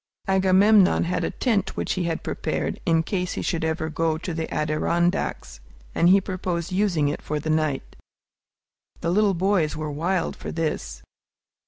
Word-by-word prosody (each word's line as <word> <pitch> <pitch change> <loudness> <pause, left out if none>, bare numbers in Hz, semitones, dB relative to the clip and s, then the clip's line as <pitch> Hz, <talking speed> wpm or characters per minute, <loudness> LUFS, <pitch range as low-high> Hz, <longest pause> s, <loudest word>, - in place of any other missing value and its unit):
Agamemnon 190 +1 +4
had 180 +1 -1
a - - 0
tent 210 -6 -1
which - - -1
he 185 -2 -2
had 165 -1 -2
provided - - -3
in 165 -1 +3
case 180 0 -2
he - - -4
should 165 -2 -1
ever 160 0 -1
go 160 0 0
to 175 +1 -5
the 160 0 -4
Adirondacks, 155 - -1 0.3
and 170 - +3
he 195 +2 +7
proposed 180 -2 -3
using 185 -6 +1
it 145 - -3
for 150 0 -3
the 155 +2 -2
night. 155 -3 -1 1.1
The 170 - 0
little 200 0 +3
boys 180 -4 +1
were 155 -1 -3
wild 170 +4 -1
for - - -7
this. 160 -2 -3
170 Hz, 165 wpm, -24 LUFS, 160-190 Hz, 1.1 s, he